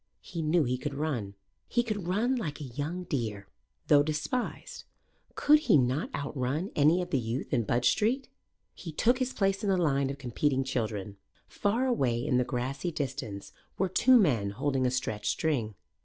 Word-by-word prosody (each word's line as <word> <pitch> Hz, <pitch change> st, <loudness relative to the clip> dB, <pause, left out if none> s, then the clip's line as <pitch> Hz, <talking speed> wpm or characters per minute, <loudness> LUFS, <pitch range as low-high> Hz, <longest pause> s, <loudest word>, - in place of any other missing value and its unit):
He 170 Hz, -, -5 dB
knew 160 Hz, +1 st, +3 dB
he 125 Hz, -1 st, -1 dB
could 145 Hz, 0 st, -4 dB
run. 130 Hz, -10 st, -3 dB, 0.3 s
He 240 Hz, -, +1 dB
could 210 Hz, -6 st, -3 dB
run 225 Hz, +8 st, +1 dB
like 165 Hz, -, -4 dB
a -, -, -6 dB
young 145 Hz, +8 st, -4 dB
deer. 115 Hz, -, -3 dB, 0.4 s
Though 145 Hz, -1 st, +6 dB
despised, 155 Hz, -, -3 dB, 0.5 s
could 300 Hz, +1 st, +5 dB
he 300 Hz, -, +4 dB
not 130 Hz, +3 st, +1 dB
outrun 145 Hz, +5 st, -2 dB
any 155 Hz, +5 st, +4 dB
of 175 Hz, -, -9 dB
the 135 Hz, -, +2 dB
youth 120 Hz, +5 st, -4 dB
in 120 Hz, -4 st, +2 dB
Budge 120 Hz, +3 st, +2 dB
Street? 250 Hz, +5 st, 0 dB, 0.5 s
He 165 Hz, -, -8 dB
took 245 Hz, -, +2 dB
his 255 Hz, 0 st, 0 dB
place 195 Hz, -3 st, 0 dB
in 205 Hz, -, -1 dB
the 190 Hz, -, +3 dB
line 140 Hz, -5 st, +1 dB
of 140 Hz, -, -4 dB
competing 135 Hz, +1 st, 0 dB
children. 110 Hz, -6 st, -3 dB, 0.3 s
Far 225 Hz, +6 st, 0 dB
away 135 Hz, -, +1 dB
in 125 Hz, -, +2 dB
the 125 Hz, -, +3 dB
grassy 130 Hz, +6 st, -3 dB
distance 130 Hz, -9 st, -5 dB, 0.2 s
were 190 Hz, 0 st, +1 dB
two 255 Hz, +7 st, +5 dB
men 125 Hz, -, +2 dB
holding 130 Hz, +4 st, 0 dB
a -, -, +2 dB
stretched 110 Hz, -4 st, -2 dB
string. 120 Hz, -10 st, -1 dB
145 Hz, 180 wpm, -29 LUFS, 125-185 Hz, 0.5 s, Though